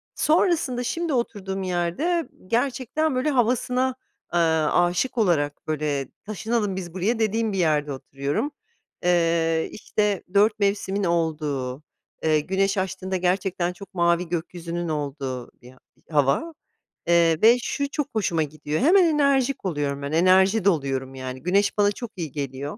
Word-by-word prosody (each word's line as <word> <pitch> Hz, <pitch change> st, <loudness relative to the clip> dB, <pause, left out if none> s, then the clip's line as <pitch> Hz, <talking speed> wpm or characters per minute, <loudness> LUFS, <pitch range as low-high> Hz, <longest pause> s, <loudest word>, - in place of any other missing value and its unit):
Sonrasında 310 Hz, -6 st, +2 dB
şimdi 330 Hz, +5 st, -2 dB
oturduğum 195 Hz, -6 st, -2 dB
yerde 185 Hz, -, -1 dB, 0.2 s
gerçekten 260 Hz, +5 st, 0 dB
böyle 255 Hz, +4 st, +1 dB
havasına, 250 Hz, 0 st, +1 dB, 0.4 s
eee, 175 Hz, -, +3 dB, 0.3 s
âşık 175 Hz, +9 st, +1 dB
olarak 155 Hz, -9 st, +1 dB
böyle, 150 Hz, -3 st, -1 dB, 0.2 s
"Taşınalım 215 Hz, -1 st, -1 dB
biz 175 Hz, -3 st, -6 dB
buraya," 205 Hz, +6 st, 0 dB
dediğim 220 Hz, 0 st, 0 dB
bir -, -, -2 dB
yerde 150 Hz, -4 st, +1 dB
oturuyorum. 140 Hz, -, -3 dB, 0.5 s
Eee, 165 Hz, -2 st, +2 dB
işte 210 Hz, -2 st, -1 dB
4 210 Hz, +2 st, +4 dB
mevsimin 200 Hz, 0 st, 0 dB
olduğu, 150 Hz, -6 st, -1 dB, 0.4 s
eee, 155 Hz, -1 st, +3 dB
güneş 195 Hz, +5 st, 0 dB
açtığında 190 Hz, 0 st, -2 dB
gerçekten 180 Hz, -1 st, 0 dB
çok 200 Hz, +2 st, -13 dB
mavi 170 Hz, -1 st, +1 dB
gökyüzünün 170 Hz, 0 st, -4 dB
olduğu 140 Hz, -4 st, -4 dB
bir 125 Hz, +1 st, -14 dB
a -, -, -22 dB, 0.3 s
hava, 145 Hz, -, +1 dB, 0.5 s
eee, 170 Hz, -2 st, +3 dB
ve 235 Hz, +3 st, +7 dB
şu 280 Hz, 0 st, -2 dB
çok 290 Hz, -1 st, -2 dB
hoşuma 175 Hz, -7 st, +1 dB
gidiyor 150 Hz, 0 st, -3 dB
hemen 365 Hz, +6 st, +6 dB
enerjik 280 Hz, -6 st, +2 dB
oluyorum 145 Hz, -5 st, -2 dB
ben 140 Hz, +1 st, -4 dB
enerji 190 Hz, +5 st, +4 dB
doluyorum 135 Hz, -7 st, 0 dB
yani 130 Hz, 0 st, -6 dB
güneş 200 Hz, +4 st, +1 dB
bana 205 Hz, 0 st, +4 dB
çok 235 Hz, +2 st, -7 dB
iyi 165 Hz, -6 st, -5 dB
geliyor 140 Hz, 0 st, -4 dB
180 Hz, 135 wpm, -24 LUFS, 155-225 Hz, 0.5 s, ve